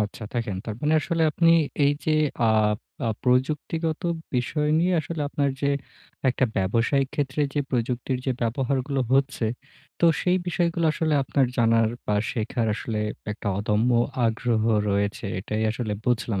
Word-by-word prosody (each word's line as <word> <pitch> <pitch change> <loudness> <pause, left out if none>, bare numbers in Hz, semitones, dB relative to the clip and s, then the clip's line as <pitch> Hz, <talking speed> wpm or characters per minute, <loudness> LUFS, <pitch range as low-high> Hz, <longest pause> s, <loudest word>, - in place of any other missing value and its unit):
আচ্ছা। 105 +2 -3
দেখেন 115 -6 -2
তার 110 - -4
মানে, 150 +1 +2
আসলে 165 +2 -1
আপনি 165 +2 +2 0.4
এই 140 - +4
যে, - - +1 0.4
আ - - +4 0.6
আপ 110 - -2
প্রযুক্তিগত 150 +6 0 0.3
বিষয় 150 +5 0
নিয়ে 180 +3 +2
আসলে 160 +1 -5
আপনার 140 -1 0
যে, 140 - +1 0.6
একটা 130 +1 +2
ব্যবসায়িক 115 +8 +1
ক্ষেত্রে 145 0 -1
যে, 145 - +2
প্রযুক্তির 125 +1 -1
যে, 130 - +2
ব্যবহারগুলো 130 +3 0
হচ্ছে। 135 -3 +2 0.5
তো - - +4 0.2
সেই 180 0 +2
বিষয়গুলো 170 -1 0
আসলে, 155 -1 0
আপনার 135 0 +1
জানার, 115 -1 +4 0.2
বা 105 - +1 0.2
শেখার 115 +1 -1
আসলে 110 0 -4 0.3
একটা 105 0 -5
অদম্য 105 +3 +1 0.4
আগ্রহ 115 0 0 0.3
রয়েছে। 100 +1 -1
এটাই 110 +3 -2
আসলে 110 -1 -3
বুঝলাম 115 -4 0
125 Hz, 145 wpm, -25 LUFS, 115-150 Hz, 0.6 s, এই